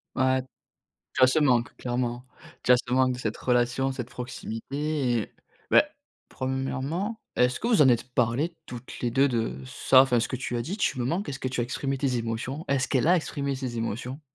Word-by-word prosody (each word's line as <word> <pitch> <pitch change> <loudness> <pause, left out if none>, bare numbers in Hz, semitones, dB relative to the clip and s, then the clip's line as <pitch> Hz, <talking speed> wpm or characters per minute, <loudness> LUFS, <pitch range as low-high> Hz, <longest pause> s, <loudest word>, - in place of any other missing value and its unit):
Ouais. 130 0 +2 0.7
Tu 130 - +3
as - - +9
ce 145 +5 +3
manque, 125 -5 +2
clairement. 120 0 -2 0.4
Tu 125 - +4
as 125 - +8
ce 120 0 -6
manque 130 -1 +3
de 125 - -7
cette 110 -2 -3
relation, 125 +2 +1
cette 125 -2 -5
proximité 130 +2 -3
et - - -9 0.4
beh - - +7 0.5
1° 135 - -3 0.2
est-ce 125 +1 +3
que 230 - 0
vous 215 -10 +5
en 135 - +7
êtes 125 0 +1
parlées 130 +8 +1
toutes 125 0 -9
les 120 - 0
2 135 +3 +3
de, 115 -2 -1
ça? 130 0 +5
Enfin 125 -3 +3
ce 115 - 0
que 130 - -3
tu 125 -1 -3
as - - -1
dit: 180 - -4
«Tu 130 - 0
me 120 - 0
manques», 170 +5 -1
est-ce 130 - -5
que 130 - -2
tu 125 -1 -1
as - - +1
exprimé 135 +2 -2
tes 130 -3 0
émotions? 115 +6 -3
Est-ce 135 -2 +1
qu'elle 135 +3 +2
a 180 - +6
exprimé 140 -4 -2
ses 125 -3 -4
émotions? 125 +6 -4
130 Hz, 215 wpm, -27 LUFS, 120-140 Hz, 0.7 s, as